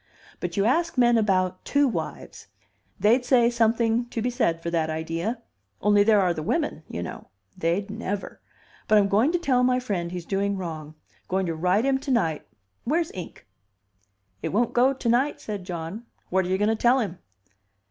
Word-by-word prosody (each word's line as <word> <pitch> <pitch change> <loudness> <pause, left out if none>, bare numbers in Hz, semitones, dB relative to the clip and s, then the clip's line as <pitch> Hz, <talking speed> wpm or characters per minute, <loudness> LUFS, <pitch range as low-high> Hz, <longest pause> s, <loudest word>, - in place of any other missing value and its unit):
But 175 +1 -4
you 200 - +2
ask 330 +6 +1
men 240 -1 +5
about 185 -4 +1
two 285 0 +2
wives. 240 - -5 0.5
They'd 235 +5 +4
say 245 -2 +4
something 230 0 +2
to 240 - -5
be 245 +3 -1
said 165 -8 0
for 170 - -3
that 160 -2 0
idea. 165 +9 -3 0.4
Only 205 0 +4
there 210 0 +5
are 180 -3 +2
the 160 - -5
women, 295 - -1
you 85 - -4
know. - - -8 0.3
They'd 185 +5 -1
never. 205 -2 -5 0.5
But 215 - +5
I'm 200 -1 +4
going 215 +9 +3
to 350 - +1
tell 265 -7 +1
my 250 0 +3
friend 185 -9 -3
he's 180 -2 -6
doing 200 +1 -1
wrong. 155 -4 -6 0.3
Going 190 +1 0
to 165 - -2
write 180 +8 +1
him 270 -1 +2
to 275 - -8
night. 165 - 0 0.4
Where's 325 +5 0
ink?" 180 - -9 1.0
"It - - -2
won't 230 +4 +1
go 250 +2 +4
to 260 -3 -5
night," 250 +5 +2
said 205 -4 -6
John. 180 +6 -6 0.2
"What 190 0 +2
are - - -4
you 190 - +1
going 210 +2 +2
to 225 - +2
tell 240 +3 +3
him?" 190 -7 -3
210 Hz, 190 wpm, -25 LUFS, 180-245 Hz, 1.0 s, men